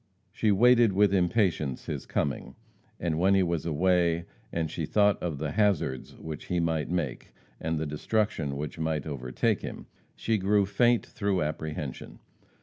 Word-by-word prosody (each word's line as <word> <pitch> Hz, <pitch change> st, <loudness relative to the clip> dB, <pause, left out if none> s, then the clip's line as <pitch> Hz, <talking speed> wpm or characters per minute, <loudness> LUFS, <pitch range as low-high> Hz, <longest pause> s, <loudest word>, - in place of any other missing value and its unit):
She 110 Hz, -, +1 dB
waited 120 Hz, +1 st, +5 dB
with 100 Hz, 0 st, +4 dB
impatience 90 Hz, -, +1 dB
his -, -, -5 dB
coming, 70 Hz, -2 st, -2 dB, 0.4 s
and 85 Hz, -2 st, -1 dB
when 95 Hz, +2 st, +4 dB
he 95 Hz, -, +4 dB
was 85 Hz, -2 st, -1 dB
away, 85 Hz, +1 st, +2 dB, 0.3 s
and 80 Hz, -2 st, -2 dB
she 80 Hz, -, -3 dB
thought 105 Hz, +1 st, +3 dB
of 85 Hz, -5 st, -2 dB
the 75 Hz, 0 st, -3 dB
hazards 100 Hz, -10 st, 0 dB
which 80 Hz, -2 st, -7 dB
he 90 Hz, -, -1 dB
might 80 Hz, -3 st, 0 dB
make, 85 Hz, -8 st, -3 dB, 0.3 s
and 80 Hz, 0 st, -2 dB
the 80 Hz, -, -2 dB
destruction 75 Hz, -1 st, -1 dB
which 75 Hz, +2 st, -5 dB
might 80 Hz, -3 st, -1 dB
overtake 65 Hz, -5 st, -1 dB
him, -, -, -7 dB, 0.3 s
she 110 Hz, -2 st, 0 dB
grew 100 Hz, +1 st, +3 dB
faint 120 Hz, +4 st, +2 dB
through 100 Hz, -5 st, -1 dB
apprehension. 75 Hz, -2 st, -5 dB
85 Hz, 155 wpm, -28 LUFS, 75-100 Hz, 0.4 s, waited